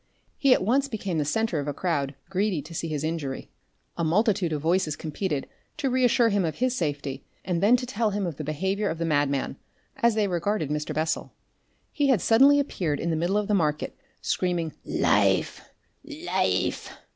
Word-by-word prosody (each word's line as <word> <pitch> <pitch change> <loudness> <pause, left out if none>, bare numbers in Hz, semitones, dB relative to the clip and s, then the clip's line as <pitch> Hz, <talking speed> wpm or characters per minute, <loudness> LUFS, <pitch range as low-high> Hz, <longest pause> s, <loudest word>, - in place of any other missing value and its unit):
He 275 - +4
at 220 - +5
once 265 +7 +2
became 200 - -3
the 150 - 0
centre 220 0 0
of 145 - -4
a 145 - -2
crowd 145 -6 -1
greedy 190 -5 0
to 160 +3 -11
see 165 - -3
his 150 -2 -3
injury. 155 -4 -4 0.5
A 170 - -1
multitude 185 +1 +2
of 150 - -1
voices 165 0 +1
competed 155 -2 -3 0.3
to 275 -3 -1
reassure 245 -2 +4
him 200 -2 +1
of 160 -2 -2
his 255 0 0
safety, 145 - -3 0.2
and 175 -2 -1
then 215 +5 +6
to 250 0 -2
tell 230 -2 0
him 200 -1 -2
of 165 -5 -4
the 155 - -4
behaviour 190 +8 -1
of 160 - -3
the 165 - -2
madman, 145 -3 0 0.4
as 235 -2 +3
they 215 -2 +2
regarded 175 -3 -1
Mr. 150 0 -2
Bessel. 160 +1 -2 0.6
He 290 -1 +1
had 260 -7 +4
suddenly 270 +9 +5
appeared 170 - -1
in 170 - -1
the - - +1
middle 175 +5 +1
of 210 -1 0
the 210 - +1
market 155 -6 0 0.3
screaming 175 -4 -1
"LIFE! - - +1 0.3
LIFE!" 310 +3 -1
180 Hz, 190 wpm, -26 LUFS, 155-220 Hz, 0.6 s, then